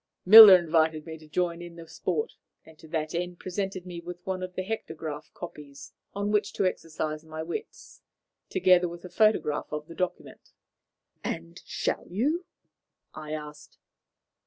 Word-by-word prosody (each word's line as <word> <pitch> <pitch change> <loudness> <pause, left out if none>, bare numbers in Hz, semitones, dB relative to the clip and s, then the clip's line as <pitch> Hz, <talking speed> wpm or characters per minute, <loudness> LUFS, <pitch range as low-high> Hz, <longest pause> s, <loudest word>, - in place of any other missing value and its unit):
Miller 210 -1 +12
invited 160 -2 +1
me 160 -1 -7
to 155 - -16
join 170 +2 -1
in 175 -1 -10
the 165 -1 -11
sport, 445 - -3 0.3
and 160 -1 -17
to 160 - -14
that 155 -1 -3
end 175 +1 -3
presented 190 0 -4
me 175 -2 -7
with 175 +1 -8
one 185 -1 -3
of 185 0 -6
the 185 - -2
hectograph 160 -7 -6
copies 145 -5 -10 0.2
on 200 +1 -1
which 205 -1 +1
to 195 - 0
exercise 155 -3 -3
my 160 0 -6
wits, 430 - -8 0.5
together 180 -1 +4
with 170 +1 -10
a - - -8
photograph 195 -6 +2
of 150 0 -4
the 165 - -11
document." 180 +1 -5 0.7
"And 85 0 -5
shall - - -2
you?" 290 - -1 0.7
I 155 0 -7
asked. 150 -1 -9
170 Hz, 160 wpm, -27 LUFS, 155-185 Hz, 0.7 s, Miller